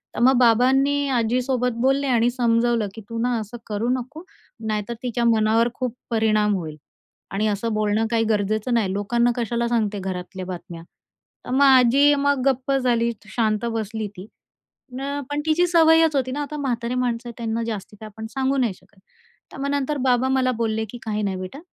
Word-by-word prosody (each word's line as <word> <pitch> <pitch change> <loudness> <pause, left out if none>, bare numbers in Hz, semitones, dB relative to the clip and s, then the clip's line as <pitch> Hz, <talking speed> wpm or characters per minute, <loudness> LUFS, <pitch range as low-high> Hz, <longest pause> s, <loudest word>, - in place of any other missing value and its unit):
तर - - -3
मग 260 +1 +5
बाबांनी 265 +4 +3
आजीसोबत 250 +1 0
बोलले 270 +2 +2
आणि 240 -2 +3
समजवलं 235 -2 +1
की 225 - -8
"तू 230 - -5
ना 245 0 +1
असं 220 +3 -7
करू 215 +3 -2
नको. 295 +7 -9 0.4
नाहीतर 215 +1 -2
तिच्या 240 -1 -1
मनावर 225 +1 +3
खूप 250 -2 -4
परिणाम 215 -2 +2
होईल 160 -5 -5 0.5
आणि 210 +2 0
असं 215 +2 -1
बोलणं 215 +1 +1
काही 230 -1 +2
गरजेचं 215 +3 0
नाही. 215 -5 +1
लोकांना 235 +4 +1
कशाला 235 0 -1
सांगते 215 -4 0
घरातल्या 185 0 -5
बातम्या?" 175 -2 -8 0.6
तर - - -6
मग 265 +2 +2
आजी 270 +2 +6
मग 280 -1 +1
गप्प 265 0 +1
झाली. 240 -3 +1 0.2
शांत 220 -1 0
बसली 220 -1 -3
ती. 185 +1 -9 0.7
न 280 +2 -3
पण 290 0 -2
तिची 320 +3 +3
सवयच 325 -2 +5
होती 260 -2 0
ना. 290 +3 -3
आता 300 +1 -5
म्हातारी 245 -3 -2
माणसं, 240 -1 -2
त्यांना 230 -1 -2
जास्ती 215 -2 -5
काय 220 - -8
आपण 220 +1 -9
सांगू 270 +2 -1
नाही 240 -6 +1
शकत. 195 +1 -24 0.5
तर - - -10
मग 280 - -1
नंतर 285 +1 -1
बाबा 250 0 +3
मला 260 -1 +2
बोलले 220 -1 0
की 245 - -8
"काही 215 -1 -2
नाही 195 -2 -1
बेटा, 185 +9 -7
235 Hz, 180 wpm, -23 LUFS, 215-260 Hz, 0.7 s, आजी